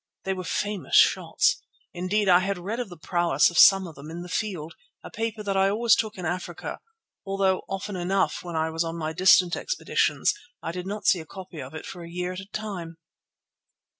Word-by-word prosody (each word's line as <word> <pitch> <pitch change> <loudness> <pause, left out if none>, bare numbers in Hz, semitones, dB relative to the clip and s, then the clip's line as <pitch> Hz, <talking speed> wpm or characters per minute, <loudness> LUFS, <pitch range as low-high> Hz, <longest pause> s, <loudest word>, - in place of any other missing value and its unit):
They 190 - -1
were 185 -1 -5
famous 205 +3 -2
shots. - - +4 0.3
Indeed, 190 +4 0
I 180 -1 +7
had 195 +1 -1
read 200 +7 -4
of 240 -5 -4
the 175 - -11
prowess 170 -2 +2
of 175 - +1
some 195 -1 +8
of 165 - -9
them 145 +1 -11
in 170 +2 -6
The 180 - -10
Field, 180 -6 -3 0.3
a - - -9
paper 225 -1 -3
that 200 -1 -1
I 195 0 +4
always 225 +3 +4
took 220 -2 -2
in 180 - -5
Africa, 175 +3 -4 0.4
although 195 -1 +1
often 195 +1 -4
enough, 185 +2 0
when 175 -2 -6
I 160 0 0
was 165 +1 0
on 165 0 -4
my 160 -1 -3
distant 180 0 +5
expeditions, - - 0 0.3
I 165 - -4
did 180 +1 -6
not 205 +1 -5
see 180 - +4
a 160 - -8
copy 185 -5 -9
of 130 +4 -9
it - - -7
for 180 - -8
a 170 - -9
year 180 +1 -3
at 185 - -6
a 195 - -9
time. 195 -6 -6
185 Hz, 215 wpm, -26 LUFS, 170-200 Hz, 0.4 s, some